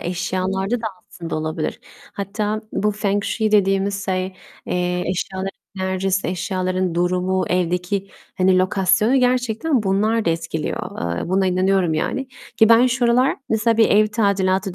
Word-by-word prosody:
eşyalarda 190 +5 -2
da 225 - -3 0.2
aslında 165 -3 -6
olabilir. 155 0 -3 0.3
Hatta 210 +2 -3
bu 210 - 0
风 205 -1 0
水 220 -2 -1
dediğimiz 195 0 +2
şey, 185 0 -2 0.3
eee, 180 0 -1
eşyaların 190 +2 -3 0.3
enerjisi, 190 0 -1
eşyaların 185 0 -1
durumu, 180 +2 +1
evdeki, 180 +2 -1 0.3
hani, 185 0 +3
lokasyonu 195 +5 +2
gerçekten 250 +2 +1
bunlar 210 +3 +1
da 170 - +2
etkiliyor. 160 - -3
Eee, - - -4
buna 190 +1 +2
inanıyorum 185 -2 +2
yani. 265 +11 -2 0.3
Ki 220 - +5
ben 230 +2 +6
şu 250 0 0
aralar 250 +3 +3
mesela 225 +1 +2
bir 225 - +5
ev 215 +1 +5
tadilatı 195 -3 0
190 Hz, 140 wpm, -21 LUFS, 180-215 Hz, 0.3 s, ben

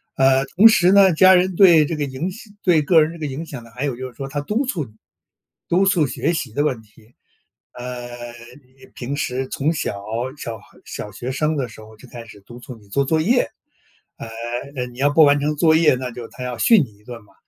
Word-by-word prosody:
呃， 135 0 +3
同 200 +10 +6
时 185 -5 +4
呢， 195 -2 +6
家 185 +3 +6
人 185 0 +1
对 170 -5 +6
这 165 - -3
个 150 - -3
影 140 +7 -4
响 215 +2 -13
对 170 -4 +3
个 160 +1 +4
人 155 +2 -4
这 170 - -12
个 155 - -3
影 145 +4 -6
响 135 -7 -9
呢， 115 - -16
还 130 +4 -3
有 135 -4 -2
就 130 +2 -6
是 120 - -20
说 135 - -6
他 145 +1 -4
督 215 - -2
促 185 -11 -2
你， 110 - -18 0.8
督 185 +3 +3
促 180 -7 +2
学 170 - -2
习 160 - -4
的 145 - 0
问 130 -6 -2
题。 110 +2 -23 0.6
呃， 125 0 -7 0.6
你 130 +1 -20
平 130 +3 -5
时 130 -2 -3
从 145 +4 -1
小， 100 -10 -4 0.3
小 115 -5 -6
孩 - - -22
小 105 - -7
学 120 +6 -6
生 150 +3 -1
的 130 -4 -3
时 110 - -14
候， 110 0 -15
就 130 - -15
开 120 -1 -10
始 105 -3 -15
督 120 +5 -13
促 125 0 -10
你 105 - -21
做 140 +7 0
作 160 +3 +1
业， 240 +9 +1 0.7
呃， - - -8 0.5
呃， 125 -1 -3
你 120 0 -14
要 145 +1 +2
不 155 +2 +6
完 145 0 +4
成 150 +1 -1
作 160 +1 +3
业， 160 -3 +4
那 125 0 -5
就 120 -1 -9
他 125 - -9
要 125 -1 -5
训 215 - +5
你 105 -6 -13
一 105 - -26
顿 120 -1 -10
嘛。 105 - -25
140 Hz, 260 characters per minute, -20 LUFS, 125-165 Hz, 0.8 s, 同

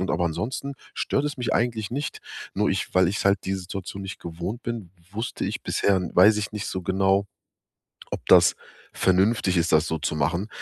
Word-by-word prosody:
Und 95 - -1
aber 90 - +1
ansonsten 125 - -3 0.2
stört 140 - 0
es 145 -1 -2
mich 125 -2 -2
eigentlich 115 -3 0
nicht. 140 +4 -4 0.3
Nur - - +2
ich - - -2
weil 95 -1 +5
ich 100 +2 -2
halt 100 -1 +4
die 95 - -1
Situation 95 +1 -6
nicht 95 0 -7
gewohnt 85 +8 -5
bin, 115 -7 -5 0.2
wusste 110 +3 -3
ich - - -3
bisher 95 -2 +2
weiß 105 +4 +7
ich 105 0 -3
nicht 105 -1 -4
so 95 - -3
genau, 95 +2 +2 0.9
ob - - -5
das - - +6 0.4
vernünftig 95 0 +2
ist, 85 0 +2
das 80 +1 +4
so 80 - -1
zu 75 - -2
machen, 85 +8 0
95 Hz, 190 wpm, -25 LUFS, 90-110 Hz, 0.9 s, weiß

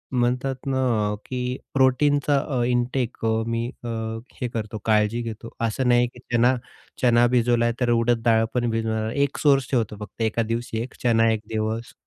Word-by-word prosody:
म्हणतात 125 +2 +1
ना 130 -1 0 0.3
अ, - - -3
की 125 0 -3 0.2
प्रोटीनचा 140 +2 +3
अ, 135 -4 -2
इंटेक 125 0 0
अ, 110 0 +1
मी 115 0 -1 0.2
अ, 120 - -5 0.5
हे 125 - 0
करतो 110 -1 -4
काळजी 110 +1 +2
घेतो, 115 0 -6
असं 115 +3 0
नाही 120 0 +4
की 125 - -15
चना 120 +2 +4 0.5
चना 120 -1 +5
भिजवला 120 -1 +2
तर 125 - +1
उडद 115 0 +2
डाळ 115 -1 +4
पण 120 -1 0
भिजवणार, 110 -1 -1
1 140 0 0
सोर्स 135 -4 +3
ठेवतो 115 -5 0
फक्त 105 +2 -9
1का 110 +1 +1
दिवशी 115 -1 -2
1 125 - -6
चणा 115 -2 +4
1 110 - -1
दिवस, 110 +1 -3
120 Hz, 175 wpm, -24 LUFS, 115-125 Hz, 0.5 s, चना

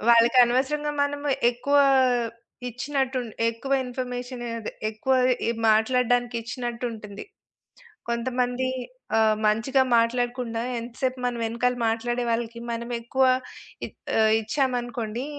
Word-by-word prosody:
వాళ్ళకి 235 +2 +5
అనవసరంగా 275 +5 0
మనము 285 0 -3 0.2
ఎక్కువ 245 +4 -1 0.9
ఇచ్చినట్టు 265 +2 -2
ఉంటు 230 -3 -9
ఎక్కువ 250 +4 -3
ఇన్‌ఫర్మేషను, 250 -1 -5
అదె 225 - -5 0.2
ఎక్కువ 220 +5 -1 0.4
ఇ - - +3 0.2
మాట్లాడడానికిచ్చినట్టుంటుంది. 235 -1 0 0.9
కొంతమంది 245 +1 -1 0.5
ఆహ్, 220 -1 +4
మంచిగా 230 +6 +2 0.2
మాట్లాడకుండా 240 0 0 0.2
ఎంత 235 +1 -8
సేపు 260 -1 0
మన 245 -1 0
వెనకాల 235 +2 0
మాట్లాడే 240 +2 -1
వాళ్ళకి 235 0 -2
మనమెక్కువ 235 +2 -1 0.6
ఇ - - -5 0.3
ఆహ్, 220 0 +5
ఇచ్చామనుకోండి 245 -1 -2
245 Hz, 100 wpm, -25 LUFS, 230-255 Hz, 0.9 s, వాళ్ళకి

